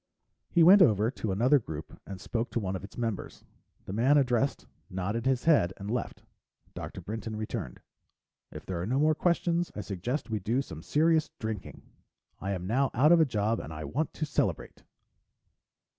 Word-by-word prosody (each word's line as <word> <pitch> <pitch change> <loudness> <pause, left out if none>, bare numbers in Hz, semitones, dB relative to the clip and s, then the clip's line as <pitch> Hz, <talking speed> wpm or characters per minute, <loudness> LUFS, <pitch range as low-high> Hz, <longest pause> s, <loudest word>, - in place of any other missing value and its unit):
He 170 - +4
went 190 +4 +8
over 110 - +4
to 110 -6 -3
another 125 +9 +4
group 80 -9 -8
and 95 -1 -7
spoke 115 +5 -3
to - - -1
one 95 -3 -3
of 95 - -6
its 100 - -11
members. 115 -5 -4 0.4
The 95 - -6
man 130 +7 +4
addressed 130 0 +1 0.2
nodded 100 +6 -2
his 130 -2 +1
head 140 - +4
and 100 +2 -6
left. 125 - -3 0.5
Dr. - - -7
Brinton 110 +1 -5
returned. 105 - -5 0.7
"If - - -9
there 90 -2 -3
are 90 - -3
no 130 +4 0
more 155 +2 +4
questions, 170 +1 0
I 105 - -3
suggest 110 - -4
we 110 - 0
do 120 +8 0
some 80 - -9
serious 160 - +2
drinking. 110 -3 -6 0.6
I 100 +1 -2
am 90 -2 -4
now 130 +7 +1
out 145 +7 +5
of 175 - +7
a - - +5
job 115 -3 0
and 75 - -7
I 80 0 -6
want 155 - -2
to 155 - -2
celebrate." 145 - -2
115 Hz, 185 wpm, -29 LUFS, 100-140 Hz, 0.7 s, went